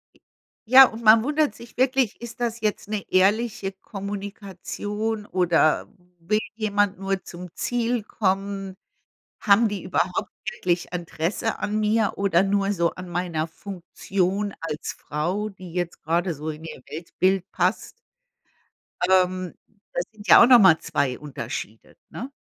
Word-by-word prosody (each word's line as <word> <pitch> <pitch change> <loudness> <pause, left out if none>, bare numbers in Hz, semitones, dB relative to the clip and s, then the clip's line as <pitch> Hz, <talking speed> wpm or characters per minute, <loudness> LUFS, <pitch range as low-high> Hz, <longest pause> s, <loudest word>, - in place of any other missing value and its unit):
E - - -27 0.4
ja, 260 +3 +9
und 230 0 -9
man 220 0 +7
wundert 300 +1 +1
sich 235 - -14
wirklich, 255 -3 +1
ist 235 +1 -9
das 235 -1 -2
jetzt 210 -1 -2
'ne 210 -2 -2
ehrliche 200 +1 +2
Kommunikation 205 +2 -5
oder 175 -4 +2 0.3
will 210 +6 +1 0.2
jemand 205 -3 0
nur 195 0 -2
zum 180 +1 -9
Ziel 240 -1 -1
kommen? 195 -2 -2 0.6
Haben 215 +2 +4
die 205 -3 -5
überhaupt 180 0 -1 0.2
wirklich 175 -3 -2
Interesse 175 +5 -2
an 215 +1 -1
mir 215 0 +2
oder 195 -3 +3
nur 200 0 +1
so 170 -3 +1
an 185 -1 -9
meiner 170 -2 -2
Funktion 195 +2 -3
als 160 -1 -4
Frau, 180 +8 -3
die 185 -4 -11
jetzt 175 -1 -3
grade 170 +2 0
so 155 +2 -5
in 155 +1 -9
ihr 160 - -8
Weltbild 185 +5 -1
passt? 185 +3 -1 1.1
Ähm, 185 -1 +2 0.4
das 175 - 0
sind 210 -1 -13
ja - - +9
auch - - +8
noch 245 -2 +8
mal 175 -6 +6
2 135 -5 -1
Unterschiede 120 -6 -7
ne? 255 +4 -7
195 Hz, 140 wpm, -24 LUFS, 175-215 Hz, 1.1 s, ja